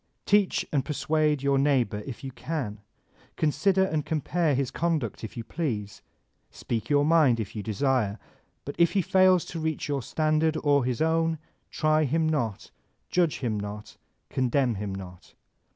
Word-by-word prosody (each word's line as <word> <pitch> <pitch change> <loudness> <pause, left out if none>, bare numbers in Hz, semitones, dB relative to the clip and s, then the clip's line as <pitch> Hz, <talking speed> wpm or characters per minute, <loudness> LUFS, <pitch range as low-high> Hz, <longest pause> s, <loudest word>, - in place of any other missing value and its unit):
Teach 205 -2 +2
and 140 -3 +1
persuade 150 -1 0
your 140 -1 +2
neighbor 130 -7 +1
if 130 -1 -7
you 135 - -5
can; 125 -8 -4 0.6
consider 180 +6 +2
and 155 -5 -1
compare 155 0 0
his 135 -1 -1
conduct 155 - -2
if 110 - -7
you 115 - -4
please; 105 -9 -4 0.5
speak 115 -1 -4
your 145 0 +3
mind 150 -7 +4
if 110 -1 -5
you 105 - -3
desire; 110 0 0 0.5
but 140 - -5
if 170 -1 +4
he 195 -3 +2
faib 185 -1 +4
to 165 - -5
reach 160 -1 -2
your 140 -2 -1
standard 155 +4 +1
or 145 -3 +3
his 125 +3 0
own, 165 0 +1 0.3
try 155 0 +2
him 160 +4 +1
not, 120 -10 -2 0.4
judge 175 -4 +2
him 110 -5 -1
not, 105 +1 -7 0.3
condemn 130 -1 +1
him 100 -1 -4
not. 90 -2 -11
145 Hz, 160 wpm, -27 LUFS, 115-160 Hz, 0.6 s, mind